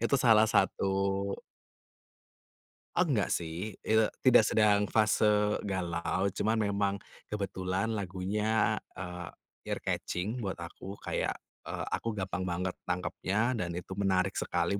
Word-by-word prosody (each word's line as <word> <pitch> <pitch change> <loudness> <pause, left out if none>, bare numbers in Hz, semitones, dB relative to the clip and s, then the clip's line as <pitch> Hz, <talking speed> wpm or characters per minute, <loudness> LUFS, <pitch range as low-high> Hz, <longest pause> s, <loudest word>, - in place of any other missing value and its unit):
itu 120 +4 +2
salah 110 -3 +6
satu 95 - +3 2.1
Enggak - - +2
sih. 85 +6 -3
Eee, 110 0 +4 0.2
tidak 125 -4 +7
sedang 105 -2 +4
fase 105 -1 +3
galau, 95 +1 -1
cuman 110 +4 0
memang 100 -2 +1 0.3
kebetulan 95 0 -2
lagunya, 105 +2 0 0.2
eee, 90 -2 -6 0.4
ear-catching 105 +8 -2
buat 100 -5 -3
aku, 85 +3 -8
kayak, - - -1 0.3
eee, - - -3
aku 115 -2 -2
gampang 95 -1 -3
banget 90 +1 -1 0.2
nangkepnya, 95 +6 0
dan 85 -2 -2
itu 90 - -7
menarik 95 -2 +2
sekali 85 +3 0
100 Hz, 115 wpm, -31 LUFS, 90-110 Hz, 2.1 s, tidak